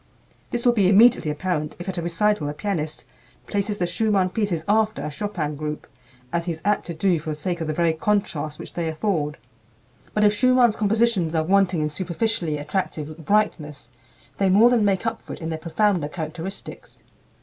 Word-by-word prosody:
This 240 0 -3
will 240 - +5
be 200 -5 +3
immediately 215 -4 +5
apparent 150 -1 -2
if 175 - -8
at 190 -2 -3
a - - -2
recital 170 -1 +1
a 145 - -5
pianist 155 -5 -3 0.4
places 205 0 -1
the 180 - 0
Schumann 190 +1 +1
pieces 185 -7 -1
after 215 +1 +2
a 150 - -4
Chopin 155 -2 -3
group, 150 +1 -5 0.5
as 170 0 0
he 175 - -1
is 160 - -11
apt 210 0 +1
to 170 - -5
do 175 0 +2
for 155 +1 -6
the 155 - -2
sake 170 +3 -3
of 160 - -2
the 155 - -1
very 170 -1 +2
contrast 160 -5 -1
which - - -9
they 170 -1 -2
afford. 160 -3 -1 0.8
But 210 - +3
if 205 0 +5
Schumann's 250 -1 +4
compositions 210 -5 +1
are 160 - +2
wanting 185 -1 +2
in 150 - 0
superficially 170 -1 -1
attractive 155 0 -4
brightness, 150 - 0 0.5
they 195 -1 +3
more 215 +6 +6
than 235 -3 +3
make 195 0 +1
up 225 - -2
for - - -8
it - - -9
in 160 - -4
their 160 -1 -3
profounder 175 0 +1
characteristics. 170 - -7
180 Hz, 195 wpm, -23 LUFS, 155-210 Hz, 0.8 s, more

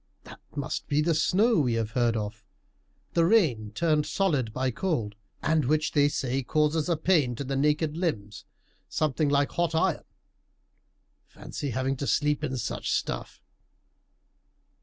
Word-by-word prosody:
That - - -12 0.2
must 140 -2 -4
be 145 - +1
the 165 +2 +2
snow 195 +7 +3
we 125 -5 +1
have 115 -1 -1
heard 120 -1 +1
of 105 +1 -5 0.7
the 170 - +3
rain 155 - +2
turned 155 +4 +1
solid 145 - 0
by 130 +3 -1
cold, 120 - -2 0.3
and 155 -1 +2
which 155 +3 +1
they 145 -1 +3
say 135 -1 -1
causes 150 +4 +1
a 170 - +2
pain 155 -7 +2
to 140 - -4
the 135 0 -3
naked 150 +2 +1
limbs 105 - -3 0.4
something 150 0 0
like 140 0 +2
hot 170 -1 0
iron. 160 - +1 1.2
Fancy 145 - -6
having 130 +2 -1
to 140 - -3
sleep 150 0 +1
in 135 -3 -2
such 115 - -3
stuff!" - - -3
145 Hz, 150 wpm, -27 LUFS, 125-160 Hz, 1.2 s, snow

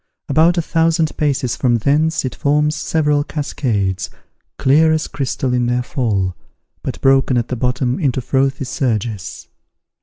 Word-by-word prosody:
About 160 +5 +3
a 170 - +1
thousand 165 -1 +1
paces 135 -5 0
from 125 -3 +1
thence 150 +6 +1
it 130 - -3
forms 150 +1 +1
several 150 -2 +1
cascades, 115 -11 -2 0.5
clear 155 +4 +4
as 160 -1 0
crystal 135 -2 -2
in 125 -1 +1
their 125 0 0
fall, 100 - -1 0.5
but - - -5
broken 135 -1 +3
at 120 - -1
the 125 - -2
bottom 125 +1 -1
into 135 -6 0
frothy 135 +2 0
surges. 115 -6 -3
135 Hz, 145 wpm, -18 LUFS, 120-150 Hz, 0.5 s, clear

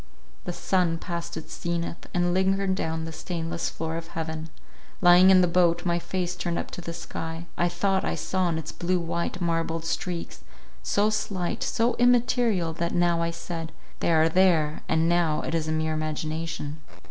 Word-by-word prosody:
— - - -30
The - - -2
sun 180 -3 +1
passed 170 -1 -5
its 160 - -8
zenith, 170 0 -3
and 175 0 +1
lingered 190 +1 +2
down 160 -3 -2
the 160 - -5
stainless 165 0 -3
floor 160 0 -4
of 165 0 -6
heaven. 160 -1 -5 0.5
Lying 180 +1 +7
in 185 -1 +7
the 180 - +4
boat, 175 0 +3
my 170 -1 +2
face 180 0 -2
turned 170 -1 -2
up - - -4
to - - -6
the 170 - -5
sky, 165 0 -6
I 175 - +2
thought 190 +3 +1
I - - -1
saw 185 -1 -1
on 170 -2 0
its 160 - -5
blue 180 +1 0
white, 170 +1 -2
marbled 165 -1 -1
streaks, 170 +1 -3 0.4
so 210 +1 +2
slight, 195 -4 -2
so 235 +1 +1
immaterial, 240 -7 +3
that 170 +1 -2
now 175 -1 +3
I 170 - +1
said— 170 -1 -5 0.3
They - - +1
are 160 0 +5
there—and 160 -2 +2
now, 170 -3 +2
It - - -3
is 160 -1 0
a - - 0
mere 160 0 0
imagination. 155 0 -3
170 Hz, 180 wpm, -26 LUFS, 160-180 Hz, 0.5 s, Lying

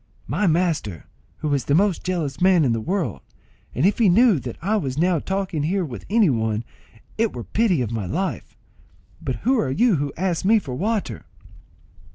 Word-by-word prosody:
"My 210 - 0
master, 160 - 0 0.4
who 150 -2 0
is 135 -3 0
the 140 - +2
most 195 0 +2
jealous 170 -7 -3
man 180 -4 +5
in 120 - +2
the 115 - -2
world; 170 - -2 0.5
and 135 - +1
if 205 - +2
he 220 -4 +5
knew 215 - +5
that 120 -2 -7
I 200 +6 0
was 135 -10 -2
now 175 +1 +2
talking 190 -2 -2
here 180 +5 0
with 125 -6 -8
any 220 -1 +4
one, 110 -2 -1 0.6
it 230 -1 +1
were 120 - -5
pity 190 - +1
of 115 - -4
my 110 -5 -3
life. 185 - -3 0.6
But - - -2
who 260 0 +3
are 140 - 0
you 195 - +3
who 145 0 -2
ask 180 -1 -1
me 220 +4 +5
for 140 -11 -4
water?" 210 - -2
175 Hz, 195 wpm, -22 LUFS, 135-200 Hz, 0.6 s, man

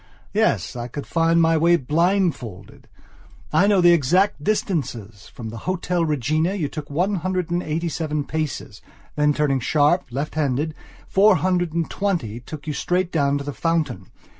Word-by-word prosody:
Yes, - - +1
I 120 -1 -4
could 140 +4 -7
find 165 0 +2
my 165 0 +4
way 170 +2 +5
blindfolded. 155 - -1 0.7
I 185 +6 +4
know 200 -3 +4
the 175 0 +7
exact 170 +2 +2
distances. 120 - -2
From 115 -3 -8
the 115 +1 -7
Hotel 180 -1 0
Regina 155 - 0
you 165 -7 -1
took 155 -2 -7
one 180 +7 0
hundred 180 0 -2
and 175 +1 +1
eighty 165 +1 -2
seven 155 -2 -2
paces, 145 -8 -4 0.3
then, 150 0 +3
turning 145 -2 +1
sharp, 150 +6 +2
left 140 +5 -4
handed, 150 0 -1 0.3
four 200 +1 +5
hundred 175 -2 0
and 165 -1 0
twenty 165 - -2
took 145 +4 -9
you 155 - -3
straight 180 +4 -1
down 140 -3 +1
to 140 - -5
the 145 0 -5
fountain. 165 0 -1
160 Hz, 165 wpm, -22 LUFS, 140-175 Hz, 0.7 s, the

